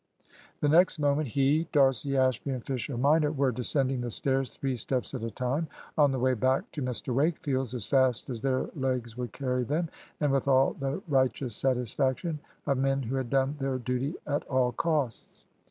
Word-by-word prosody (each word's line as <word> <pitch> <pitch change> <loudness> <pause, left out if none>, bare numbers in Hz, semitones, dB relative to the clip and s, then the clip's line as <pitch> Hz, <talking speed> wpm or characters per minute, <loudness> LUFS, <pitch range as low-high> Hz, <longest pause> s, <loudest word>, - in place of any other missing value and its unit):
The 150 - +3
next 175 +5 +5
moment 145 0 +1
he, 140 +6 +2
D'Arcy, 135 -1 +3
Ashby, 130 +1 +1
and 130 -3 -3
Fisher 130 -1 -3
minor 150 +4 +3
were 140 -3 +1
descending 130 +1 0
the 120 - -3
stairs 135 +2 -1
three 135 -2 -2
steps 125 +3 -2
at 130 - -4
a 115 - -2
time 130 +7 -2 0.3
on 145 -2 +5
the 135 - -1
way 130 +1 +2
back 130 +3 +1
to 150 - -5
Mr 125 -1 -3
Wakefield's 135 -3 0
as 115 -5 -3
fast 130 -3 +2
as 120 -4 -5
their 130 0 0
legs 125 -5 -2
would 125 -3 -4
carry 125 -2 -1
them, 155 +6 -1 0.3
and 145 -2 +2
with 135 0 +1
all 135 0 +4
the 140 +6 -3
righteous 130 -4 +1
satisfaction 130 - 0 0.3
of 135 -2 +1
men 135 0 +1
who 125 +3 -3
had 130 -3 -2
done 135 +2 +1
their 135 -1 -1
duty 130 +5 -2
at 145 0 -1
all 130 -2 +2
costs. 150 -6 -2
135 Hz, 185 wpm, -29 LUFS, 125-140 Hz, 0.3 s, next